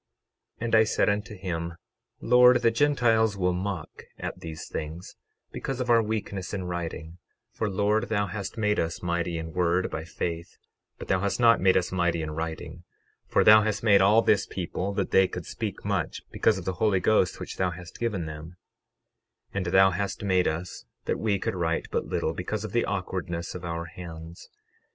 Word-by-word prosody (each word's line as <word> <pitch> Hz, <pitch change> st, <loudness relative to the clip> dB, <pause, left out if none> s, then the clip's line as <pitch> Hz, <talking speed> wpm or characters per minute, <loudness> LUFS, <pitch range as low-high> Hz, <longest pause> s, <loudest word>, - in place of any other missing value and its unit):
12:23 -, -, -1 dB
And 115 Hz, -, +2 dB
I 110 Hz, -, +7 dB
said 110 Hz, -, +1 dB
unto 105 Hz, +1 st, -2 dB
him: 85 Hz, -3 st, -4 dB, 0.5 s
Lord, 125 Hz, +1 st, +6 dB
the 115 Hz, -, +5 dB
Gentiles 115 Hz, -5 st, +2 dB
will 90 Hz, -1 st, +1 dB
mock 90 Hz, -3 st, -5 dB
at -, -, -5 dB
these 80 Hz, -1 st, -7 dB
things, 80 Hz, +3 st, -6 dB, 0.4 s
because 135 Hz, -1 st, -4 dB
of 125 Hz, -1 st, 0 dB
our 115 Hz, -1 st, +6 dB
weakness 105 Hz, -3 st, -3 dB
in 95 Hz, -, -3 dB
writing; 85 Hz, -1 st, -5 dB, 0.3 s
for 110 Hz, -, -2 dB
Lord 105 Hz, +4 st, +1 dB
thou 105 Hz, -2 st, +1 dB
hast 100 Hz, +4 st, -6 dB
made 105 Hz, -1 st, +1 dB
us 80 Hz, +1 st, -2 dB
mighty 85 Hz, -1 st, -1 dB
in 80 Hz, 0 st, -6 dB
word 90 Hz, +1 st, +1 dB
by 80 Hz, -, -4 dB
faith, 85 Hz, +1 st, -5 dB, 0.4 s
but -, -, -9 dB
thou 95 Hz, -, +2 dB
hast 100 Hz, +4 st, -1 dB
not 115 Hz, -1 st, +5 dB
made 95 Hz, 0 st, +5 dB
us 90 Hz, -, -1 dB
mighty 85 Hz, -3 st, 0 dB
in 75 Hz, -, -4 dB
writing; 80 Hz, +1 st, -5 dB, 0.4 s
for -, -, +3 dB
thou 110 Hz, 0 st, +8 dB
hast 110 Hz, 0 st, -1 dB
made 100 Hz, -3 st, +6 dB
all 105 Hz, +4 st, +5 dB
this 100 Hz, -1 st, +3 dB
people 95 Hz, +2 st, -3 dB
that 100 Hz, -2 st, -1 dB
they 95 Hz, 0 st, +5 dB
could -, -, -6 dB
speak -, -, -5 dB
much, -, -, -2 dB
because 110 Hz, -3 st, +2 dB
of 90 Hz, -, -7 dB
the 95 Hz, -, -1 dB
Holy 105 Hz, -4 st, +3 dB
Ghost 95 Hz, -2 st, +2 dB
which -, -, -7 dB
thou 95 Hz, -, +1 dB
hast 90 Hz, 0 st, -10 dB
given 105 Hz, -8 st, -1 dB
them; 80 Hz, +2 st, -8 dB, 1.0 s
12:24 -, -, -5 dB
And 95 Hz, -, -1 dB
thou 95 Hz, +2 st, +5 dB
hast 100 Hz, +3 st, -3 dB
made 95 Hz, -2 st, +2 dB
us 85 Hz, +3 st, -4 dB, 0.2 s
that -, -, -1 dB
we 105 Hz, -3 st, +1 dB
could 95 Hz, -, -2 dB
write 85 Hz, -3 st, -1 dB
but -, -, -1 dB
little, 80 Hz, -, -1 dB
because 100 Hz, +5 st, -4 dB
of 110 Hz, -, -5 dB
the 120 Hz, +3 st, +1 dB
awkwardness 90 Hz, -3 st, -3 dB
of 90 Hz, -, -7 dB
our 85 Hz, -1 st, -3 dB
hands. 85 Hz, -1 st, -10 dB
95 Hz, 195 wpm, -27 LUFS, 85-105 Hz, 1.0 s, thou